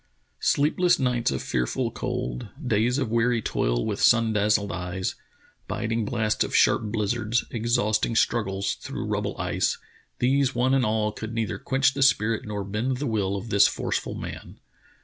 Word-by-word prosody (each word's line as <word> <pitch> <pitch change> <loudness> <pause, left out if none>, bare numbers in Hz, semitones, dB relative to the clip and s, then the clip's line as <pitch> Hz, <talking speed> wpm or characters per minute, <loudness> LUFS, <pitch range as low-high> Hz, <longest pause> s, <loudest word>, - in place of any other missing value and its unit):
Sleepless 175 +5 +2
nights 125 -3 +1
of 65 - -3
fearful 60 -1 -1
cold, 60 0 -4 0.2
days 120 +2 +2
of 130 -6 -1
weary 115 +1 +2
toil - - -1
with - - -3
sun 115 -2 +4
dazzled 105 0 +2
eyes, 90 +1 -3 0.5
biting 115 0 -2
blasts 110 -1 0
of - - -4
sharp 115 - +4
blizzards, 110 +2 0
ex 115 +1 0
hausting 110 0 +1
struggles 100 -5 +1
through - - -6
rubble - - -2
ice - - 0 0.2
— - - -32
these 135 +1 +2
one 125 +2 +2
and 130 -4 +3
all 105 0 0
could 110 +2 -7
neither 115 -2 -2
quench 135 +1 +2
the 140 - -4
spirit 115 -5 +2
nor 105 -1 -3
bend 110 +6 -2
the 145 - -3
will 100 -5 0
of 100 +4 -6
this 100 - +6
forceful - - -3
man. - - -8
110 Hz, 170 wpm, -25 LUFS, 105-125 Hz, 0.5 s, this